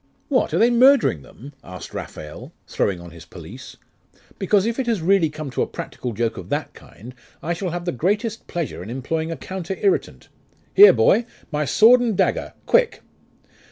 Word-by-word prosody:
'What! 270 - +1
are - - 0
they 235 +2 +4
murdering 245 - +4
them?' 135 - -14
asked 90 -1 -10
Raphael, 75 0 -8
throwing 95 -3 -1
on 85 -1 -11
his 85 -1 -13
pelisse. 85 - -12 0.6
'Because, 195 +1 +2
if 230 +3 -2
it 260 - -2
has 230 -4 +1
really 175 -1 +2
come 155 -2 -7
to - - -2
a - - 0
practical 125 - -6
joke 115 +1 -2
of - - -9
that - - -3
kind, 125 +4 -14 0.3
I 170 - -1
shall 180 +2 -4
have 175 +1 -5
the 175 - -1
greatest 210 - -2
pleasure 170 - -4
in 95 - -9
employing 160 +6 -3
a 165 - -5
counter 190 0 -6
irritant. 395 0 -1 0.4
Here, 410 +2 +9
boy! 235 +1 +3 0.2
My 150 0 -1
sword 235 - +5
and 225 -6 -1
dagger! - - 0
Quick! - - +2
175 Hz, 185 wpm, -21 LUFS, -, 0.6 s, Here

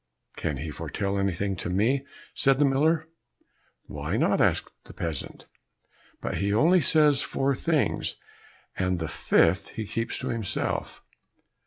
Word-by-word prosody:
"Can 75 -4 -2
he 75 +3 -5
foretell 100 +7 -3
anything 100 0 -1
to 85 - -4
me?" 115 +9 +1 0.3
said 135 -1 +3
the 145 - +4
miller. 155 +4 +2 0.8
"Why - - -3
not?" - - +2
answered - - +2 0.2
the - - -13
peasant, 80 -5 -5 0.8
"but - - -3
he 100 +1 0
only 165 - +4
says 150 -1 +4
four 135 +1 0
things, 155 +1 0 0.6
and 90 -1 0
the 80 -2 -3
fifth 85 +4 +2
he 110 - -3
keeps 115 +2 -2
to - - -4
himself." 115 -5 -3
110 Hz, 140 wpm, -27 LUFS, 95-140 Hz, 0.8 s, the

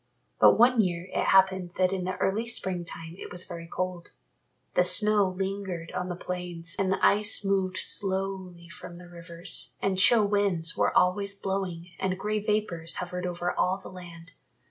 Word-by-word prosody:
But - - +6
one 240 0 +4
year 175 -2 -3
it - - -1
happened 190 -2 +2
that 185 0 +1
in 185 -2 -3
the 185 0 -4
early 215 +6 -1
spring 185 -6 -2
time 165 0 -8
it - - -9
was 180 0 +1
very 170 -2 -9
cold. 180 0 -5 0.6
The - - +3
snow 210 -2 +6
lingered 190 -2 -5
on 180 - -4
the 175 - -4
plains 175 -2 -4
and 190 -1 0
the 190 - +1
ice 210 0 +3
moved 190 -1 -1
slowly 190 -3 -1
from 175 0 -11
the 175 0 -13
rivers 170 0 -1
and 190 -1 -1
chill 220 +2 +5
winds 195 -5 0
were - - +1
always 200 +2 +2
blowing 185 -3 -4
and 190 -1 -2
grey 210 +2 -2
vapours 200 -6 -2
hovered 180 0 -5
over 175 0 -3
all 185 +1 -1
the 195 - -12
land. 175 -1 -10
185 Hz, 175 wpm, -26 LUFS, 175-195 Hz, 0.6 s, But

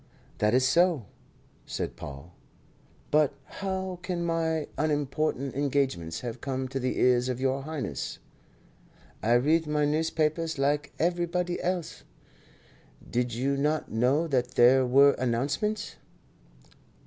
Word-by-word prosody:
"That 105 +3 +3
is 130 0 +4
so," 170 - +3 0.6
said - - -4
Paul; 70 +5 -9 0.8
"but 150 -1 +4
how 190 -1 -4
can 175 -1 -3
my 160 -2 0
unimportant 145 -2 -1
engagements 135 - -1
have 120 -1 -6
come 130 -1 -2
to 135 +1 -3
the 130 0 -2
ears 125 0 +3
of 125 -1 -2
Your 135 +1 0
Highness?" 140 - -4 1.0
"I 115 +3 +2
read 155 +6 +3
my 150 -1 +1
newspapers 160 +1 0
like 145 +1 0
everybody 175 +1 0
else. 180 -2 -2 1.1
Did 120 -1 -1
you 135 +3 0
not 150 +3 0
know 125 +8 +2
that 130 -3 -1
there 130 +1 +6
were 140 +3 +6
announcements?" 140 - -1
140 Hz, 120 wpm, -28 LUFS, 125-160 Hz, 1.1 s, there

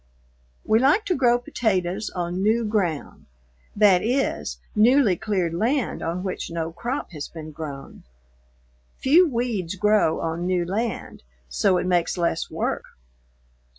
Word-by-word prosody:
We 220 +1 +4
like 295 - +3
to 365 - +1
grow 245 -3 +4
potatoes 210 -5 -1
on 175 +1 -3
new 225 +3 +2
ground, 190 -8 -2 0.5
that 200 -4 +5
is, 255 +5 -1 0.2
newly 225 -1 +5
cleared 185 -4 -1
land 240 - 0
on 175 +2 -3
which 190 -2 -4
no 165 -1 -3
crop 240 - -4
has 150 -4 -6
been 155 -2 -9
grown. 145 -3 -8 1.0
Few 325 +6 +5
weeds 230 - -2
grow 210 -4 +2
on 165 +2 -2
new 180 -1 +1
land, 215 +3 -3 0.3
so 65 - +2
it 180 - -1
makes 175 -1 +1
less 170 -1 -1
work. - - -2
190 Hz, 135 wpm, -24 LUFS, 170-235 Hz, 1.0 s, that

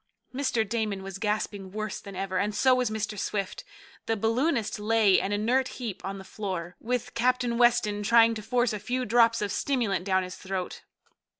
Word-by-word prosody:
Mr. 255 -5 0
Damon 210 -3 -2
was 195 0 -7
gasping 210 -3 -2
worse 215 0 -4
than 200 -2 -10
ever, 190 0 -2
and 205 +1 -1
so 260 +3 +4
was 250 -2 +1
Mr. 215 -1 -3
Swift. 195 -1 -3 0.4
The 225 - +1
balloonist 225 +1 0
lay 210 -2 +4
an 195 - -2
inert 240 +6 +1
heap 230 -7 -5
on 195 +1 -4
the 190 - -9
floor, 185 -3 -5
with 245 0 -2
Captain 245 0 +1
Weston 235 -4 +3
trying 230 +1 +5
to 220 - -5
force 240 +2 +1
a 210 - -3
few 250 +4 -2
drops 230 -1 +4
of 205 - -2
stimulant 225 -8 0
down 190 -1 +1
his 180 0 -7
throat. 190 -1 -5
215 Hz, 185 wpm, -27 LUFS, 195-235 Hz, 0.4 s, trying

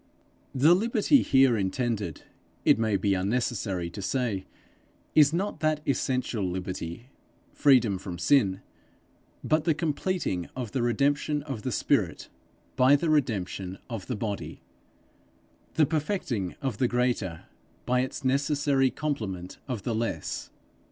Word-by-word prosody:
The 150 +6 +6
liberty 230 +7 +3
here 130 -3 +4
intended, 105 - -2 0.4
it - - +5
may 110 -3 +2
be 100 0 +1
unnecessary 100 -2 -1
to 100 - -7
say, 100 -1 -1 0.7
is 150 -2 +6
not 190 +5 -2
that 155 -1 +1
essential 130 -5 0
liberty 95 +4 -5 0.4
freedom 120 -9 +4
from 90 -2 -6
sin, 100 -1 +3 0.8
but 155 0 +1
the 160 -3 +3
completing 155 - -1
of 125 -5 -4
the 130 - -1
redemption 140 +5 +1
of 135 -7 -5
the - - -3
spirit - - 0 0.5
by 130 +3 +6
the 155 +2 +1
redemption 100 -9 -1
of 110 -6 -5
the 125 - -2
body, 105 -2 -5 1.1
the 155 - +5
perfecting 145 - -2
of 130 -6 -2
the 125 - +3
greater 120 -9 -1 0.4
by 125 0 +2
its 130 +1 -3
necessary 140 0 +2
complement 105 -13 -4
of 120 -7 -4
the 120 - -1
less. 115 +1 -3
125 Hz, 130 wpm, -27 LUFS, 100-145 Hz, 1.1 s, The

